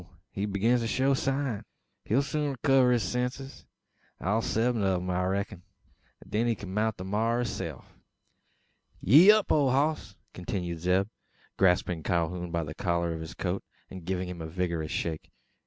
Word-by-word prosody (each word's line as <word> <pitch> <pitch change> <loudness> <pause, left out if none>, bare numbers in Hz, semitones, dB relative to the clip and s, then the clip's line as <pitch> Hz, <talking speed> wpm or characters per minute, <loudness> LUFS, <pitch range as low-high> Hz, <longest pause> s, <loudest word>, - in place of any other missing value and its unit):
he 100 +1 -2
begins 110 +5 +2
to 115 - -1
show 135 +4 +2
sign! 135 -4 -1 0.4
He'll 130 +6 +2
soon 145 -1 -2
rekiver 130 -1 +4
his 120 -3 +2
senses 125 +6 -4 0.5
all 105 +5 +1
seven 115 +1 0
o' 95 -1 +2
'em, 90 +1 -2
I 90 0 0
reck'n 100 0 -2 0.6
an - - -16
then 115 +3 +1
he 115 - +2
kin 95 -3 -8
mount 110 +1 0
the 90 - -6
maar 110 +5 0
o' - - 0
hisself. 120 - -6 1.1
"Yee 170 +10 +8
up, 215 -1 +2
ole 145 -3 +4
hoss!" 135 -6 0 0.2
continues 90 -2 -4
Zeb, 90 +3 +2 0.5
grasping 90 -2 +2
Calhoun 85 +1 -1
by 85 0 -1
the 75 0 -6
collar 85 -1 -1
of 80 - -6
his 80 - -8
coat, 95 +1 -2 0.3
and 95 -2 -8
giving 90 +1 -2
him 90 -2 -7
a 80 - -5
vigorous 85 -2 -2
shake. 80 -2 -3
100 Hz, 170 wpm, -28 LUFS, 90-125 Hz, 1.1 s, Yee